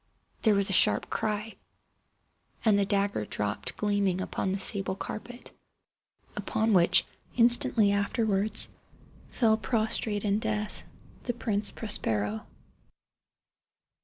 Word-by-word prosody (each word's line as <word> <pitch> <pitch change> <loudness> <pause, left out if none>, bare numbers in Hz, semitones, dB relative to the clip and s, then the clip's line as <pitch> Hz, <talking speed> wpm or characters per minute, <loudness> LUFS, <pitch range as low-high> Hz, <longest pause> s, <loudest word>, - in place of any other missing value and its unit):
There 215 -3 +4
was 200 -1 +3
a - - +1
sharp - - +4
cry—and 215 0 -4
the 200 - +1
dagger 200 - 0
dropped 105 0 -3
gleaming 200 -3 0
upon 190 0 -2
the 195 - -1
sable 195 -1 -1
carpet, 245 +5 -8 0.8
upon 220 0 0
which, 175 -3 +5 0.3
instantly 235 -3 +3
afterwards, 200 0 0 0.6
fell 220 -3 +2
prostrate 215 0 -1
in 205 0 +1
death 215 -1 -3 0.4
the 245 - -1
Prince 210 -3 -1
Prospero. 110 - -2
205 Hz, 105 wpm, -28 LUFS, 195-220 Hz, 0.8 s, which